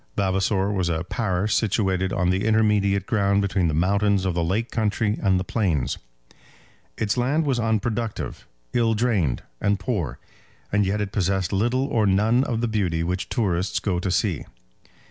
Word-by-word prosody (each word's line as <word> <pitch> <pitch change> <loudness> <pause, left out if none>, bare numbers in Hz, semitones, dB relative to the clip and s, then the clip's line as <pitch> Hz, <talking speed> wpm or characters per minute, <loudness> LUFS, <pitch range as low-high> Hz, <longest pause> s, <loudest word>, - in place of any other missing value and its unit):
Vavasor 95 +1 +1
was 95 -4 0
a 80 0 -1
parish 100 +1 -1
situated 95 -4 +1
on 90 -2 +1
the 95 +2 0
intermediate 105 -3 +2
ground 100 -2 +2
between 95 -3 +1
the 80 - 0
mountains 100 +3 +2
of 95 - 0
the 85 0 0
lake 105 +8 -1
country 105 -1 0
and 95 -3 +3
the - - -2
plains. 90 - -1 1.0
Its 110 +1 0
land 140 +6 +1
was 135 -4 +1
unproductive, 110 0 -2 0.3
ill 115 -2 +2
drained, 105 - 0 0.2
and 100 0 +1
poor, 95 - -2 0.5
and 100 -1 +2
yet 105 +2 0
it 100 -1 -3
possessed 95 -2 0
little 120 +7 +1
or 115 -7 +1
none 110 +6 +3
of 115 -2 -2
the 120 - +1
beauty 90 -7 0
which 90 +3 -2
tourists 95 -4 0
go 90 -4 -1
to 95 - -2
see. 90 -3 0
100 Hz, 165 wpm, -24 LUFS, 95-110 Hz, 1.0 s, and